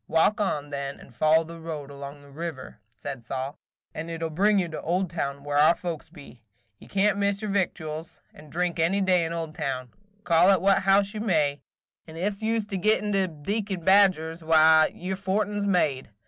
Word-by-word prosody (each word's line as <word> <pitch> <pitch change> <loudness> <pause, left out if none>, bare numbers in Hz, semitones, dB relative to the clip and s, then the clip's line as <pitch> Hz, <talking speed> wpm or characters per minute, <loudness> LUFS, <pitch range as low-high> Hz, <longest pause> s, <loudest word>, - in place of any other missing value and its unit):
Walk 180 +7 +2
on, 145 -7 -1
then, 140 -1 -5
and 130 - -15
follow 155 +4 +4
the 165 +1 -10
road 155 -4 -6
along 140 +1 -9
the 140 - -16
river," 145 -7 -7 0.2
said 140 -3 -6
Sol, 135 +4 -5 0.3
"and 160 +2 -6
it 165 0 -5
'll 165 - -2
bring 200 +6 +3
you 185 -3 +1
to 155 - -6
Oldtown, 170 -6 -2
where 145 0 0
our 155 +3 +6
folks 170 -4 -6
be. 145 -7 -14 0.4
You - - -15
can't 200 +1 +1
miss 200 0 +1
your 210 - -2
victuals 160 -5 -3
and 150 -1 -15
drink 175 0 -1
any 170 +5 +2
day 180 -3 +3
in 165 - -4
Oldtown, 145 -6 -4 0.3
call 175 +1 +4
at 195 -2 +5
what 195 +2 +3
house 195 +1 +3
you 215 - -4
may; 150 -9 +1 0.5
and 160 0 -10
ef 200 +4 -2
you 225 +1 +1
's 215 - -4
to 205 -2 -4
get 215 +4 +2
into 200 -2 +1
Deacon 190 +4 -3
Badger's, 180 -4 +3
why, 160 0 +6
your 185 +2 -4
fortin 205 +2 -1
's 200 - -1
made. 150 -9 +1
165 Hz, 200 wpm, -26 LUFS, 150-195 Hz, 0.5 s, our